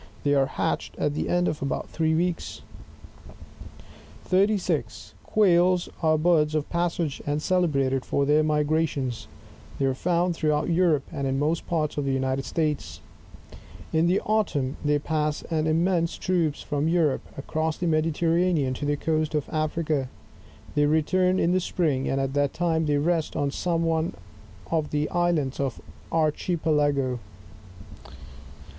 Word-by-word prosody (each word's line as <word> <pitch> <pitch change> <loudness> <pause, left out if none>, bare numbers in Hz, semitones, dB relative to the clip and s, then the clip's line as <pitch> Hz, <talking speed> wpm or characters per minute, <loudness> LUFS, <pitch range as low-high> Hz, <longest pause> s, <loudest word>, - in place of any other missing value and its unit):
They 145 - +2
are 135 -1 +3
hatched - - -2
at 150 - 0
the - - -2
end 175 0 +2
of 150 - -2
about 140 - -2
three 160 -1 0
weeks. 175 +1 -2 1.6
36. 195 +1 0
Quails 180 -3 +3
are 155 -1 +3
birds 155 -2 +2
of 150 -1 -1
passage, 170 -4 -1
and 145 +1 0
celebrated 140 -7 +1
for 140 - 0
their 150 +2 +4
migrat 155 +1 +2
tions^ 130 -5 -4 0.5
they 135 - 0
are 135 - +2
found 175 +5 +1
throughout 150 0 0
Europe, 165 -4 +3
and 140 -4 -3
in 135 0 0
most 155 +4 -1
parts 155 -3 -1
of 145 - -2
the 135 - 0
United 130 0 -1
States 150 - -2 0.9
In 160 +1 +3
the 185 +3 +3
autumn, 165 -12 0
they 145 0 +2
pass 150 0 -1
in 155 -1 +1
immense 170 +1 +1
troopa 170 -5 0
from 145 0 -1
Europe, 165 -4 +2 0.2
across 155 +3 -2
the 180 - -3
Mediterranean 165 -2 +1
to 140 - -4
the 145 0 +1
coast 155 0 -1
of 150 - -1
A&iea^, 155 -3 -1 0.7
they 145 -1 +3
return 180 +5 +2
in 170 - +2
the 185 - +3
spring, 155 -7 0
and 135 - 0
at 135 0 -1
that 145 -1 0
time 165 -2 +1
they 145 -1 +2
rest 160 +2 0
on 140 -1 0
som&: 170 +2 -1
one 165 0 0 0.6
of 160 -2 0
the 150 0 0
Islands 175 -6 0
of 135 -4 -1
the - - -15 0.3
archipelago. 150 -5 +1
155 Hz, 150 wpm, -25 LUFS, 145-170 Hz, 1.6 s, their